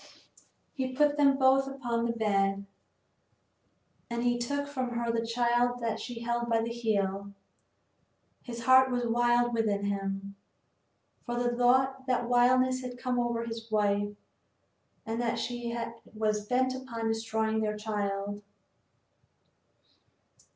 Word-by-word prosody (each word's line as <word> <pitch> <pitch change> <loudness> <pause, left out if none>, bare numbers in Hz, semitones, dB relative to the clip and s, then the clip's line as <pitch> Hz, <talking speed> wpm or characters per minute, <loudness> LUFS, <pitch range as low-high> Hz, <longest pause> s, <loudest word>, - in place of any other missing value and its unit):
He 260 -2 -3
put 295 +1 +3
them 280 -2 +4
both 270 0 +4
upon 240 -4 -2
the 235 - +1
bed, 200 -3 0 1.4
and 235 0 -2
he 240 0 +1
took 285 +4 -1
from 260 -3 -3
her 235 0 0
the 230 0 0
child 240 +1 +1
that 230 -2 -2
she 240 -2 -6
held 235 0 -1
by 225 -1 +2
the 230 - -3
heel. 200 -4 -1 1.1
His 235 -1 -7
heart 260 +2 +6
was 245 -1 -1
wild 240 +1 +2
within 210 -3 0
him, 195 0 -3 0.9
for 240 - -4
the 240 0 0
thought 260 +2 +2
that 245 -2 +1
wildness 255 +1 +3
had 250 -1 -6
come 250 0 -1
over 235 -1 0
his 225 0 -7
wife, 205 -1 +1 0.9
and 225 +2 -2
that 235 -1 0
she 240 -1 -3 0.4
was 215 -1 -1
bent 255 +2 +2
upon 245 -3 -4
destroying 220 0 0
their 210 -1 -1
child. 205 -1 -3
235 Hz, 130 wpm, -30 LUFS, 220-250 Hz, 1.4 s, heart